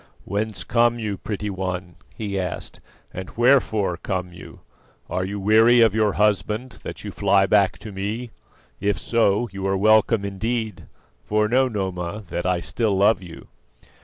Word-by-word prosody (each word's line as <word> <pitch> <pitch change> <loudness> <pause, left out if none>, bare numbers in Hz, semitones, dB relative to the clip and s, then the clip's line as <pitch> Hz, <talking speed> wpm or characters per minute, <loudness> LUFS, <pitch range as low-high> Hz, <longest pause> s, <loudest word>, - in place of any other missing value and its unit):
"Whence 100 -1 -3
come 120 +4 +2
you, 105 -3 -3
pretty 105 +1 -4
one?" 90 -2 -4 0.2
he 100 -3 -3
asked, 90 -2 -5 0.3
"and 95 0 -6
wherefore 115 -7 +3
come 90 +1 -4
you? 90 - -12 0.5
Are 90 - -1
you 100 +2 -4
weary 110 +4 +5
of 110 -3 +5
your 110 -2 +2
husband, 105 +4 0
that - - -7
you 105 - -5
fly 100 0 +3
back 100 -1 +3
to 110 - -9
me? 105 +5 -4 0.5
If 100 +1 0
so, 115 0 +1
you 95 0 -4
are 95 0 +1
welcome 110 +1 +4
indeed; 110 +3 -3 0.4
for 105 0 +1
know, 130 +4 +3
Noma, 95 -2 -4
that 85 - -2
I 90 -1 +1
still 100 +6 -1
love 100 +2 +4
you." 85 -3 -12
100 Hz, 160 wpm, -23 LUFS, 95-110 Hz, 0.5 s, weary